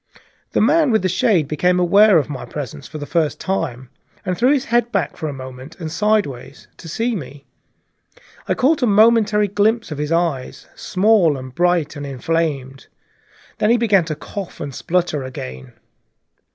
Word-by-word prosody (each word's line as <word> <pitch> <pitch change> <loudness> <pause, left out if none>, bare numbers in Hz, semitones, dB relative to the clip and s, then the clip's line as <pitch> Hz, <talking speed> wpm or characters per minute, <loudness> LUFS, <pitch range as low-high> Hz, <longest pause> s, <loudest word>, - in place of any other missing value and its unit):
The - - +2
man 300 +6 +4
with 220 -5 +2
the - - +2
shade 185 - +2
became 180 +5 +1
aware 200 +2 +5
of 150 - +1
my 140 -3 -6
presence 140 -2 -7
for 155 - -8
the 145 - -6
first 160 -1 -1
time, 130 -10 -3 0.3
and 185 - -1
threw 245 +8 +3
his 275 -2 +1
head 240 0 +1
back 190 -8 -1
for 155 - -4
a - - -4
moment, 130 +3 -10
and 160 -3 -5
sidewise, 165 - -1
to 165 - -10
see 230 +8 -1
me. 140 -5 -8 1.0
I - - +1
caught 285 +4 +2
a 250 - +3
momentary 215 0 +4
glimpse 215 +1 +1
of 150 - -5
his 150 +1 -3
eyes, 165 -6 -1
small 185 -6 +2
and 130 -1 -9
bright 175 -1 +1
and 145 - -6
inflamed. 135 -1 -2 0.7
Then 210 - +2
he 235 - +5
began 205 -7 +3
to 155 -2 -4
cough 195 +4 -8
and 145 -2 -5
splutter 170 -1 -1
again. 65 - -8
170 Hz, 175 wpm, -19 LUFS, 145-210 Hz, 1.0 s, aware